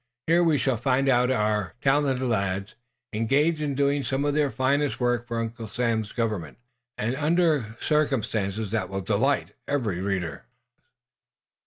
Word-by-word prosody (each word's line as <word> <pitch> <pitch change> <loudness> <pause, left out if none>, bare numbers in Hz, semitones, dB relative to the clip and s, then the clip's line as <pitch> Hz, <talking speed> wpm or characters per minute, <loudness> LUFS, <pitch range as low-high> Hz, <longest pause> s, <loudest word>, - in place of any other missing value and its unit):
Here 170 +2 +4
we 160 -3 +3
shall 130 -1 +1
find 130 +3 +1
our 110 -6 +1
talented 135 -1 +2
lads 100 -3 -1 0.4
engaged 145 +9 +2
in 145 -2 -1
doing 140 0 +1
some 135 +2 -1
of 145 - +1
their 150 -1 +2
finest 135 +3 0
work 120 -1 0
for 115 0 -3
Uncle 115 0 -4
Sam's 110 -1 -1
Government, 105 - -3 0.4
and 120 +4 -1
under 150 -7 +1
circumstances 110 -9 0
that 110 -5 -1
will 95 0 -3
delight 110 +9 +1 0.2
every 115 -11 -1
reader. 95 -4 -3
120 Hz, 140 wpm, -26 LUFS, 105-140 Hz, 0.4 s, Here